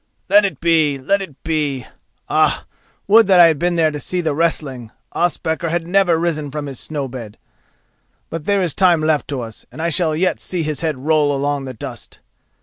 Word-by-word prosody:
Let 205 +1 +6
it 195 - -3
be! 160 -4 +2
Let 195 +10 0
it 165 -8 -8
be! 150 -6 -1 0.4
Ah, - - +1 0.4
would 220 +1 +6
that 190 -2 +5
I 175 - +10
had 160 -3 +3
been 175 +1 0
there 160 -2 +2
to 150 - -5
see 180 +5 -2
the 160 -4 0
wrestling—Ospakar 160 +3 -2
had 165 0 -1
never 180 -1 +3
risen 160 -3 -2
from 150 +1 -5
his 135 -3 -6
snow 145 -3 -4
bed. 120 -5 -9 0.9
But 165 -2 -5
there 200 -2 +2
is 170 -5 -1
time 175 -2 +3
left 155 -1 +1
to 140 -3 -3
us, 115 -2 -9
and 130 - -12
I 165 +1 0
shall 165 -2 +2
yet 180 +4 0
see 180 -3 -3
his 155 -1 -2
head 160 -4 -1
roll 145 +1 +1
along 140 0 -1
the 130 -1 -7
dust. - - -9
160 Hz, 200 wpm, -19 LUFS, 145-175 Hz, 0.9 s, I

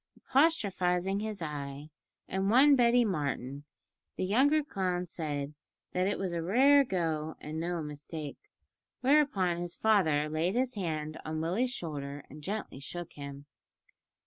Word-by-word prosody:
Apostrophising 200 - +2
his 210 -4 -4
eye 145 -1 -6 0.4
and 190 +1 0
one 275 +5 +7
Betty 240 -1 +4
Martin, 145 - -2 0.5
the - - -1
younger 280 +10 +4
clown 185 -8 -1
said 150 -4 -4 0.4
that 185 +1 +1
it 205 - 0
was 190 -2 -2
a 170 -1 -2
"rare 270 +11 +5
go 160 - -2
and 155 +1 -5
no 170 0 -2
mistake," 150 0 -7 0.6
whereupon 255 - +3
his 175 0 -4
father 160 -9 +3
laid 160 +6 0
his 255 0 +1
hand 155 -6 -3
on 155 0 -3
Willie's 185 +11 0
shoulder 145 - -5
and 150 +2 -10
gently 200 -4 -4
shook 175 +4 -7
him. 140 0 -8
175 Hz, 140 wpm, -31 LUFS, 150-215 Hz, 0.6 s, one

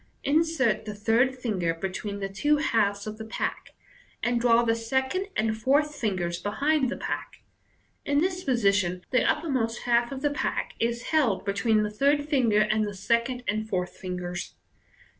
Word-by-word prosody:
Insert 285 -7 +2
the 210 -1 -5
third 230 +5 +2
finger 185 -9 -1
between 195 +3 -4
the 195 - -1
two 295 +11 +1
halves 205 -8 +1
of 215 0 -6
the - - -5
pack, 220 - -4 0.5
and 240 0 +1
draw 235 -1 +5
the 225 -1 +2
second 265 - -1
and 220 0 +1
fourth 285 +7 +2
fingers 185 -9 -2
behind 275 +7 +1
the - - -4
pack. - - -5 0.6
In 285 - 0
this 365 +2 -1
position, 200 - +1
the 255 -2 +3
uppermost 260 -8 0
half 240 0 +2
of 270 0 -6
the 290 - +2
pack 290 - -2
is 235 +1 -1
held 275 -11 +2
be 200 - 0
tween 215 +1 +2
the 210 - -2
third 285 +6 +2
finger 240 -8 +3
and 215 0 +2
the 205 - -6
second 235 +5 0
and 215 +1 -1
fourth 180 -3 -1
fin 180 -1 -5
gers. 175 0 -5
230 Hz, 175 wpm, -27 LUFS, 205-265 Hz, 0.6 s, draw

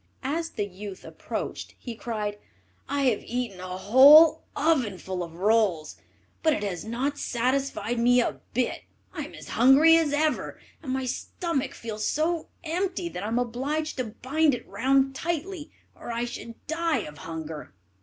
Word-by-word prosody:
As 325 +5 -1
the 210 -9 -3
youth 195 0 -9
approached, - - -6
he 240 - -7
cried, 210 -3 -4 0.5
"I 280 0 0
have 245 -6 +2
eaten 240 -6 -4
a 185 0 -5
whole 295 +10 +8
ovenful 210 - 0
of 165 -1 -9
rolls, 195 -5 +1 0.5
but 315 -1 +3
it 210 - -2
has 185 -4 -3
not 260 +6 -2
satisfied 245 -2 -1
me 245 +1 +5
a 240 - 0 0.2
bit; 250 0 0 0.3
I - - -4
am - - -11
as - - -11
hungry 280 +7 +6
as 320 -3 +1
ever, 305 +1 0 0.2
and 270 - -5
my 265 0 -1
stomach 280 +1 -3
feels 215 -2 -4
so 320 +2 0 0.2
empty 355 +1 -2
that 180 - -6
I 205 - -3
am 230 +2 -1
obliged 270 +7 -2
to 255 - -1
bind 275 +6 +1
it - - -10
round 270 +6 +2
tightly, 340 +2 -4 0.3
or - - -7
I 235 +1 -1
should 235 -1 -9
die 330 +1 0
of 150 -1 -10
hunger." 160 - -7
250 Hz, 165 wpm, -26 LUFS, 210-305 Hz, 0.5 s, whole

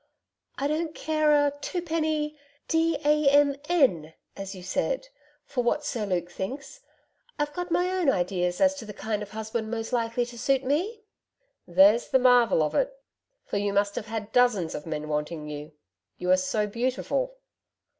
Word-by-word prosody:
'I 280 - 0
don't 315 +1 -2
care 310 -1 +1
a 290 -1 +4
twopenny 315 -2 -1 0.3
d 325 -1 +2
a 300 -1 +4
m 285 0 +4
n 180 - +2 0.2
as 195 0 -6
you 185 - -10
said - - -1 0.4
for 250 -3 -2
what 295 +5 0
Sir 220 -4 -2
Luke 175 -2 -1
thinks. 270 - -6 0.6
I've 295 0 -1
got 355 +2 -4
my 355 +2 +1
own 365 -6 +2
ideas 180 -4 0
as 285 0 +5
to 230 - -7
the 210 -2 -9
kind 210 0 -3
of 205 - -6
husband 220 +1 -4
most 225 +1 -4
likely 235 0 0
to 240 -1 -10
suit 270 +2 +2
me.' 365 - -1 0.6
'There's 195 +6 +5
the - - +5
marvel 245 -9 +5
of 150 - -1
it. - - 0 0.5
For - - -2
you 200 0 0
must 200 0 +2
have 220 - -5
had 220 -1 -5
dozens 220 -10 +3
of 150 - -6
men 155 -1 -4
wanting 150 +1 -3
you. 150 +1 -7 0.4
You 180 0 0
are - - +8
so 210 +3 0
beautiful.' 260 - -2
240 Hz, 175 wpm, -27 LUFS, 195-300 Hz, 0.6 s, are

